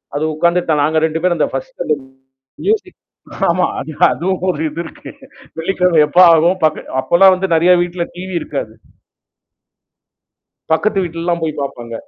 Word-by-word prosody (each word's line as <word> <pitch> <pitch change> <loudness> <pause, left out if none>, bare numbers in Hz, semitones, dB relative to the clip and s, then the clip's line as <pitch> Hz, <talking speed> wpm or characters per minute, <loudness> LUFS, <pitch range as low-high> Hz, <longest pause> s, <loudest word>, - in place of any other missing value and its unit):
அது 145 - -1
உட்கார்ந்துட்டோம். 170 -1 +1
நாங்க 155 +2 +1
2 160 0 -3
பேரு 180 -1 +1
அந்த 155 - +1
பர்ஸ்ட் - - -6
அந்த 155 - +1 0.7
மியூசிக் 405 -3 -1 0.5
ஆமா. 180 +1 +1
அது, 155 - -7 0.2
அதுவும் 185 +1 -2
ஒரு 180 - -1
இது 155 +3 -6
இருக்கு. 160 - -11 0.5
வெள்ளிக்கிழமை 180 -1 +1
எப்ப 150 +4 -2
ஆகும் 165 +3 +3 0.4
அப்பெல்லாம் 175 +8 +5
வந்து 190 +1 -2
நெறயா 175 +3 +5
வீட்ல 175 0 -3
டிவி 185 +1 -7
இருக்காது. 135 -8 -5 2.0
பக்கத்து 195 +5 +1
வீட்லலாம், 170 0 -3
போய் 155 -2 -3
பாப்பாங்க. 120 -4 -6
170 Hz, 140 wpm, -16 LUFS, 155-185 Hz, 2.0 s, அப்பெல்லாம்